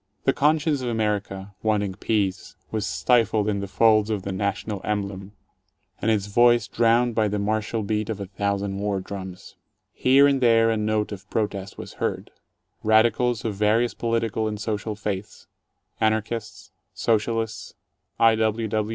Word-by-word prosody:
The - - +3
conscience 150 -1 +2
of 125 - -2
America, 105 -3 -2
wanting 105 -3 0
peace, 100 -1 -2 0.2
was 110 -1 -2
stifled 110 -4 +2
in 100 -1 0
the 100 - -4
folds 110 +1 +3
of 105 -4 -2
the 100 - -4
national 100 +1 -3
emblem, 100 -1 -3 0.7
and 110 - +1
its 105 -3 +1
voice 120 +2 +4
drowned 120 +1 +2
by 110 -1 +2
the 105 0 -2
martial 110 +2 -1
beat 105 +1 -2
of 110 -2 -3
a 100 - -4
thousand 100 0 -2
war 100 -1 -1
drums. 95 -1 -8 0.4
Here 135 +2 +5
and 140 -2 +2
there 115 -2 +4
a - - +1
note 105 0 0
of 100 0 -9
protest 100 -3 -3
was - - -8
heard. - - -2 0.5
Radicals 110 +1 +2
of 110 - -1
vari 105 +4 +2
ous 120 - -5
political 115 -1 -1
and 105 -1 -4
social 105 0 -3
faiths 105 0 -5 0.3
— - - -38
Anarchists, 110 0 -2 0.2
Socialists, 115 0 -1 0.4
I. 115 0 +6
110 Hz, 155 wpm, -24 LUFS, 100-115 Hz, 0.7 s, I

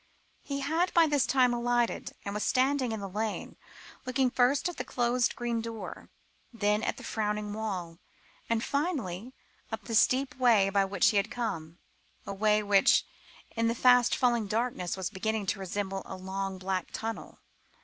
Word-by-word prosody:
He 280 -1 -4
had 325 +6 +1
by 335 -1 +7
this 290 -5 +2
time 255 -2 +3
alighted, 240 0 0
and 200 - -3
was 210 - -2
standing 260 -1 +2
in 220 -2 -4
the 200 - -4
lane, 215 +3 -4 0.5
looking 255 0 +1
first 255 +6 +2
at 355 - -5
the - - -2
closed 245 0 0
green 235 -1 -2
door, 225 -1 -7 0.4
then 210 -2 +1
at - - -2
the - - -10
frowning 210 -1 -2
wall, 185 -6 -4 0.5
and 230 0 +1
finally 260 - -2 0.4
up 220 -1 -4
the 230 - -6
steep 260 +4 +3
way 225 -6 +4
by 200 0 +3
which 195 -1 +3
he 210 - +1
had 200 - +1
come 170 -9 -4 0.5
a 200 - -4
way 210 +1 +2
which, 200 -1 +4 0.5
in 230 0 +1
the 230 - 0
fast 245 -1 +5
falling 240 -4 +1
darkness, 215 -5 -1
was 190 -3 -3
beginning 220 +2 -2
to 195 +1 -1
resemble 195 0 -3
a 190 - -6
long 190 +1 -4
black 185 -1 -2
tunnel. 225 0 -5
220 Hz, 170 wpm, -29 LUFS, 195-250 Hz, 0.5 s, by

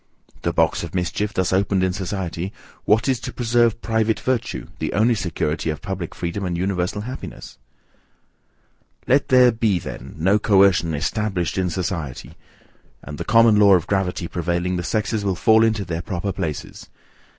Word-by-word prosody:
The - - 0
box - - +1
of 85 +1 -7
mischief 95 +3 -1
thus 95 -3 0
opened 95 0 +1
in 95 -1 +1
society, 95 -1 -4 0.3
what 110 +4 +3
is 130 -3 +1
to - - -6
preserve 120 -1 +1
private 110 -1 +1
virtue, 130 -3 -2
the - - -2
only 110 +4 +3
security 85 -5 -2
of 75 -1 -3
public 90 0 -5
freedom 85 +3 -4
and 90 -2 -2
universal 95 +2 -1
happiness? 125 +5 -8 1.5
Let 135 +2 +3
there 125 -1 +6
be 110 -4 +1
then 65 -5 -8
no 95 +6 +3
coercion 95 -6 +3
ESTABLISHED 90 +1 -1
in 90 -1 0
society, 85 -7 -4 0.7
and 75 0 -8
the - - -2
common 115 -1 +5
law 100 -2 +7
of 85 - 0
gravity 95 -3 -1
prevailing, 85 +2 -1
the 90 - -1
sexes 110 +2 -1
will 95 -2 0
fall 110 +5 +4
into 110 -3 +1
their 85 -1 -3
proper 95 0 -3
places. 85 -6 -5
95 Hz, 160 wpm, -22 LUFS, 85-110 Hz, 1.5 s, law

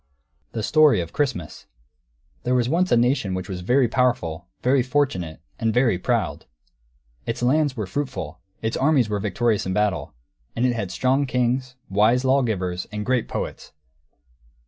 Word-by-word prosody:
THE 110 - -3
STORY 150 - +5
OF 85 -2 -5
CHRISTMAS 110 - -3 0.7
There 125 +1 0
was 120 -1 +2
once 175 +6 +1
a - - +5
nation 120 -5 +1
which 90 -1 -4
was 90 -2 -5
very 125 +7 +3
powerful, 110 -10 0 0.2
very 130 +1 +4
fortunate, 125 - -1 0.2
and 115 -1 +1
very 115 -5 +2
proud. - - -1 0.8
Its 115 - -2
lands 145 +1 +2
were 105 - -2
fruitful; 95 - -4 0.2
its 110 - -1
armies 135 -5 +3
were 105 -1 -1
victorious 105 +1 0
in 95 - -1
battle; 105 -9 -1 0.4
and 120 - +1
it 125 - +2
had 105 -5 -3
strong 135 +5 +1
kings, 125 +1 0
wise 110 +6 +3
lawgivers, 110 -10 0
and 105 0 -4
great 125 -3 +1
poets. - - -5
120 Hz, 155 wpm, -23 LUFS, 95-130 Hz, 0.8 s, STORY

